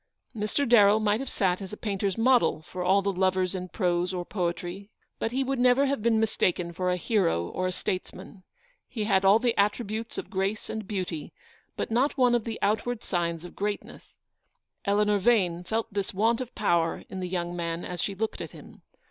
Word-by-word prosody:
Mr. 215 +6 -1
Darrell 215 -3 +6
might 210 0 +1
have 270 -1 -4
sat 185 -1 0
as 190 - -7
a 210 - -7
painter's 200 -2 -2
model 245 -8 +3
for 180 +3 -7
all 195 +2 +3
the 200 - +1
lovers 185 0 +1
in 185 -1 -5
prose 180 0 0
or 175 -1 -3
poetry; 175 +1 -3 0.3
but 225 - -1
he 265 +2 0
would 265 -1 -2
never 250 +2 +5
have 275 -3 -1
been 225 0 +3
mistaken 180 -5 0
for 180 +2 -1
a 180 - +1
hero 175 - +1
or 185 - -2
a - - -1
states 185 0 -3
man. 190 +1 -12 0.5
He 225 -4 -4
had 195 -2 +2
all 195 +2 +7
the 235 0 +1
attributes 215 +2 -1
of - - -6
grace 195 +2 -2
and 220 -3 -5
beauty, 185 -6 -4 0.4
but - - -3
not 260 +6 +2
one 250 -2 +4
of 240 -2 +1
the 225 -1 -4
outward 220 +3 0
signs 170 -2 -2
of 175 - -11
great 205 +1 -2
ness. - - -15 0.7
Eleanor 205 0 +3
Yane 185 -6 +2
felt 225 +1 -2
this 200 -1 -2
want 230 +4 +2
of 250 -1 -7
power 170 -5 +1
in 190 - -6
the 180 -1 -3
young 175 -1 -2
man 170 0 -3
as 180 -1 -4
she 200 - -2
looked 220 +2 -3
at - - -7
him. - - -14
200 Hz, 205 wpm, -27 LUFS, 180-225 Hz, 0.7 s, all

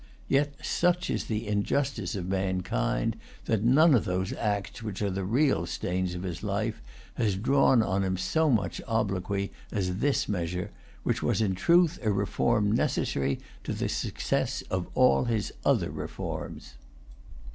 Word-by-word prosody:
Yet, 145 +1 +2
such 180 +1 +1
is - - -1
the 110 0 -3
injustice 105 0 0
of 95 -3 -3
mankind, 95 -11 0 0.3
that 110 -2 +1
none 145 +7 +6
of 120 - +4
those 90 -1 -1
acts 105 +2 -2
which 105 -4 -5
are 100 - 0
the 95 +1 -2
real 130 +9 +2
stains 90 0 -2
of 90 - -5
his 90 -3 -4
life 105 +2 -2 0.4
has 105 -5 +1
drawn 125 +2 +4
on 100 -1 0
him 95 -1 0
so 160 - +1
much 115 -6 0
obloquy 100 -3 -1 0.2
as 95 -3 -1
this 140 +3 +1
measure, 90 +1 -2 0.3
which - - 0
was - - +1
in 105 -4 +2
truth 170 - +3
a 110 -3 +1
reform 105 +2 +1
necessary 70 -10 0 0.3
to - - -3
the - - -2
success - - -1
of 95 -1 -1
all 125 0 +4
his 115 -3 -1
other - - +2
reforms. - - -6
105 Hz, 155 wpm, -28 LUFS, 95-120 Hz, 0.4 s, none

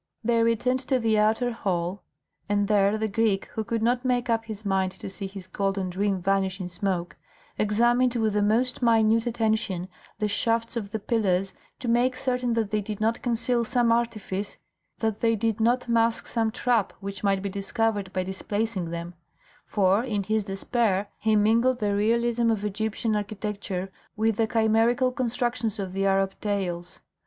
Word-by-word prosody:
They 230 0 +2
returned 230 +3 +2
to 265 - +3
the 225 -3 +2
outer 220 +3 +2
hall, 185 -4 -2 0.5
and 205 0 +2
there 205 0 +3
the 220 0 -1
Greek, 215 -2 +1
who 220 - -2
could 230 0 -2
not 245 +2 +2
make 245 -2 +1
up 225 0 0
his 215 -1 -8
mind 190 -1 +1
to 190 - -8
see 195 0 -5
his 190 -1 -9
golden 195 0 -2
dream 195 +1 0
vanish 190 +1 0
in 180 -1 -4
smoke, 180 -1 -2 0.4
examined 240 +4 +3
with 220 -3 +1
the 210 - +2
most 235 +6 +1
minute 225 -1 +3
attention 220 -6 0 0.3
the 210 0 0
shafts 230 +3 0
of 210 -4 -3
the 220 - -2
pillars 195 -4 0 0.2
to 250 - -6
make 245 +2 +2
certain 250 -2 0
that 225 -3 -1
they 215 -1 +1
did 205 0 -5
not 225 +2 0
conceal 240 0 +1
some 240 0 +2
artifice, 215 -4 -1 0.4
that 220 -2 -1
they 230 -1 +2
did 225 0 -1
not 245 +3 +2
mask 230 -1 +2
some 225 -2 0
trap 235 -2 +1
which 200 0 -6
might 195 -1 +1
be 200 - -2
discovered 200 0 -1
by 185 - -1
displacing 190 0 -3
them; 170 +1 -5 0.5
for 200 +2 +2
in 210 -6 -1
his 215 +1 0
despair 200 0 0
he 220 -1 +2
mingled 230 +4 +3
the 205 -3 0
realism 235 +2 +2
of 210 -2 0
Egyptian 220 +2 -1
architecture 200 -2 -4 0.3
with 220 -1 +1
the 225 - +2
chimerical 230 +3 +3
constructions 240 -3 -1
of 190 -2 -4
the 195 +1 +1
Arab 195 0 +2
tales. 180 -4 -3
215 Hz, 175 wpm, -26 LUFS, 195-230 Hz, 0.5 s, to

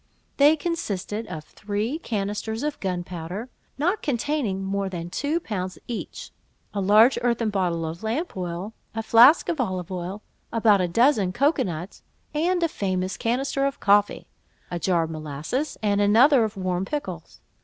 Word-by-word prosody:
They 290 +2 +6
consisted 225 - -3
of 155 - -6
three 210 - -3
canisters 220 -1 -3
of 300 -1 -2
gunpowder, 180 +3 -4 0.3
not 355 +9 0
containing 250 -7 -1
more 195 0 -1
than 175 -2 -6
two 295 - 0
pounds 185 - -4
each; 235 - -6 0.4
a 200 - -1
large 215 +6 +5
earthen 235 -2 +1
bottle 175 -4 0
of 160 +2 -6
lamp 240 +11 -2
oil, 180 +3 -4 0.2
and 225 -1 -3
flask 240 +8 +7
of 325 -6 0
olive 185 -6 -3
oil; 185 +3 -5 0.3
about 215 -4 +4
a 180 - +1
dozen 215 0 +3
cocoa 280 +6 +2
nuts, 175 +1 -6 0.3
and 345 +3 +1
a - - +4
famous 185 - -2
canister 270 +5 -1
of 275 - -5
coffee; 205 0 +3 0.5
a 175 - -2
jar 170 -1 +2
of 160 - -5
molasses, 155 - -4
and 205 -1 +2
another 235 +6 +6
of 215 -1 -3
warm 185 -1 -1
pickles. 190 - -5
205 Hz, 155 wpm, -25 LUFS, 185-260 Hz, 0.5 s, flask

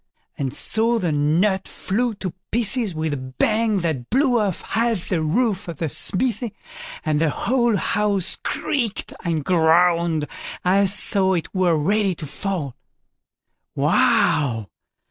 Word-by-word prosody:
And 135 -2 -3
so 225 - +4
the 175 -7 -1
nut 170 +7 +1
flew 230 +3 -2
to 185 -3 -5 0.2
pieces 230 -4 0
with 155 -1 -2
a - - -2
bang 205 - 0
that 155 -8 -3
blew 255 -1 +2
off 200 -5 -1
half 225 -5 -1
the 175 -4 0
roof 205 +5 0
of 170 -4 -6
the 160 0 -2
smithy, 235 - 0 0.5
and 155 -1 +1
the 165 - +3
whole 240 - +1
house 205 -3 0
creaked 240 -8 -3
and 160 -4 -2
groaned 170 -2 +3 0.4
as 195 +2 +1
though 190 -2 +2
it 165 - -4
were 180 -4 +2
ready 195 +4 +1
to 155 - -7
fall. 150 -4 -4 1.0
"Why! 125 -8 +2
185 Hz, 135 wpm, -22 LUFS, 160-215 Hz, 1.0 s, so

